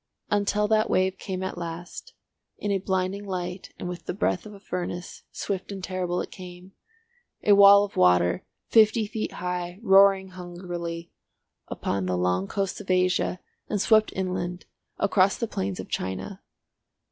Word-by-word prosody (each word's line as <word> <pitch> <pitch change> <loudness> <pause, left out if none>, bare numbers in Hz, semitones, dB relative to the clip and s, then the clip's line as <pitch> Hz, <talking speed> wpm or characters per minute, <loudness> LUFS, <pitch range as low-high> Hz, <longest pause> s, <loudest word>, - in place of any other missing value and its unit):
Until 205 0 +2
that 220 0 +3
wave 185 0 +1
came 190 -2 -4
at 190 -2 -4
last—in 175 +4 -8
a 195 - +1
blinding 190 +1 -1
light 180 -1 -5
and - - -5
with 175 0 -7
the - - -2
breath 215 - 0
of 210 - -10
a - - -13
furnace, 180 -2 -5
swift 195 0 -4
and 195 -2 -6
terrible 180 -1 -2
it - - -7
came—a 210 - -7
wall 200 0 +8
of 205 - -6
water, 90 0 +3 0.2
fifty 220 0 +4
feet 215 +1 -4
high, 180 0 -4
roaring 195 -2 +5
hungrily, 175 -2 -6 0.6
upon 95 -2 -2
the 90 -1 0
long 90 +2 0
coasts 195 - -2
of 195 - -13
Asia, 180 0 +1 0.3
and 210 - 0
swept 215 +2 +4
inland 180 -1 -3 0.3
across 195 -1 +3
the 230 - -1
plains 95 - -3
of 95 - -6
China. 95 - -4
185 Hz, 150 wpm, -26 LUFS, 175-200 Hz, 0.6 s, wall